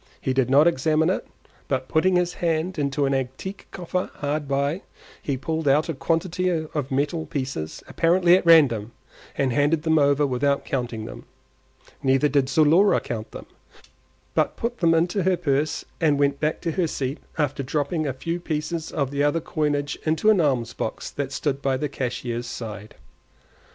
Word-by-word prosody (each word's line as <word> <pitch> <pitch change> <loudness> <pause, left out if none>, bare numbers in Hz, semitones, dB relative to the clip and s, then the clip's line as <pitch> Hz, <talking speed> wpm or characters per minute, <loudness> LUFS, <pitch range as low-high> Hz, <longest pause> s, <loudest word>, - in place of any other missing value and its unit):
He 130 - -1
did 130 -1 +1
not 140 +3 +6
examine 160 +1 +2
it, - - -3 0.4
but 130 -1 -1
putting 180 +4 +2
his 180 0 +1
hand 170 +1 -1
into 140 0 0
an 135 - +1
antique 135 +9 -4
coffer 180 0 -3
hard 145 0 -2
by, 140 +6 0 0.4
he 140 -2 -2
pulled 160 +3 -3
out 150 +4 +3
a - - 0
quantity 170 +5 0
of 155 -5 -2
metal 145 +4 -1
pieces 130 - -4
apparently 175 +1 +4
at 185 - +1
random, 130 -10 +5 0.4
and 130 -3 +1
handed 150 +3 +2
them 160 -1 +3
over 145 0 +3
without 140 +1 0
counting 120 -4 -3
them; - - -9 0.8
neither 135 +2 +3
did 140 -2 +1
Zulora 160 +8 +4
count 110 -2 -5
them, - - -9 0.9
but - - +1
put 240 +1 -3
them 165 -2 +4
into 175 +4 +1
her 185 0 +2
purse 145 -2 0
and 150 -3 +3
went 140 0 +1
back 155 +1 -1
to 170 - -1
her 175 +1 0
seat 135 -1 -3 0.2
after 145 -2 0
dropping 150 +3 -1
a 135 - -1
few 170 +6 -3
pieces 160 0 -3
of 140 -4 -1
the 140 0 -1
other 145 +3 +2
coinage 150 -2 -2
into 160 +7 +3
an 195 -5 +3
alms 125 -6 0
box 110 - -4
that 140 -2 -4
stood 140 -1 -2
by 135 -1 +1
the 150 - -2
cashier's 120 -3 -4
side. 110 -3 -7
145 Hz, 175 wpm, -24 LUFS, 135-165 Hz, 0.9 s, not